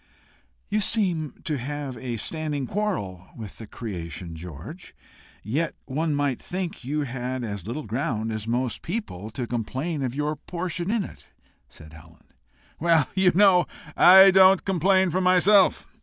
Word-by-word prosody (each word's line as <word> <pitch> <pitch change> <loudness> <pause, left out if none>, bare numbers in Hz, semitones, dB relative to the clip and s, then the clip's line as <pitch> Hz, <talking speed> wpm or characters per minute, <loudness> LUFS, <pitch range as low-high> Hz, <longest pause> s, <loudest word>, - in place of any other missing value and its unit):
"You 210 +1 0
seem 180 - -1
to 150 -4 -2
have 140 0 -5
a 120 0 -5
standing 150 +2 -2
quarrel 120 - -3
with 110 -4 -9
the 110 - -9
creation, 85 -7 -7
George! 90 - -10 0.5
Yet 150 - -2
one 150 +3 -1
might 145 -3 0
think 180 -5 -5
you 150 +4 -2
had 130 -1 -4
as 100 -4 -5
little 130 +7 -4
ground 115 -1 -2
as 110 0 -4
most 120 +1 -1
people 165 - -5
to 120 +3 -4
complain 130 +7 -3
of 130 -1 -2
your 150 +1 -1
portion 175 +2 -4
in 225 -1 +1
it," - - -12 0.4
said 80 0 -15
Helen. 80 +1 -16 0.6
"Well, 165 -3 +3
you 190 -1 +4
know, 190 -2 +5 0.3
I 190 +2 +9
don't 190 0 +6
complain 190 0 +2
for 185 - 0
myself. 185 +2 +4
145 Hz, 150 wpm, -25 LUFS, 115-180 Hz, 0.6 s, I